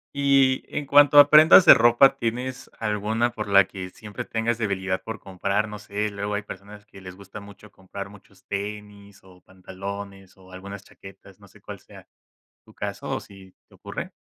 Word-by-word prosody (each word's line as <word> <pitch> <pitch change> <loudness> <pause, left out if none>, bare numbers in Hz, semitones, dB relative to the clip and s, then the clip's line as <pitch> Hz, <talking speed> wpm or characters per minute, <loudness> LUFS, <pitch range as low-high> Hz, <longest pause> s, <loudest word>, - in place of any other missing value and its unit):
Y, 135 -2 +2
en 145 -2 -4
cuanto 145 +1 +6
a 145 0 +7
prendas 155 +4 +7
de - - +10
ropa, 120 +3 +4
¿tienes 125 +2 -5
alguna 110 +2 -2
por 105 -3 -7
la 100 -1 +5
que 95 -2 -9
siempre 105 -2 -9
tengas 115 +1 -2
debilidad 95 -4 -3
por 110 0 -7
comprar? 100 +3 -3
No 105 - -8
sé, 105 +1 -4
luego 100 0 -5
hay 105 - -2
personas 100 +1 -12
que 95 - -15
les 95 -1 -11
gusta 100 +2 -12
mucho 100 +1 -16
comprar 100 +1 -10
muchos 100 -1 -20
tenis 100 0 -8
o 90 -1 -20
pantalones 95 +1 -10
o 95 -1 -19
algunas 100 +1 -10
chaquetas, 95 -1 -16
no - - -18
sé - - -22
cuál - - -10
sea - - -17 0.6
tu - - -22
caso - - -6
o - - -2
si 95 -2 -17
te - - -25
ocurre. - - -8
100 Hz, 185 wpm, -23 LUFS, 95-115 Hz, 0.6 s, de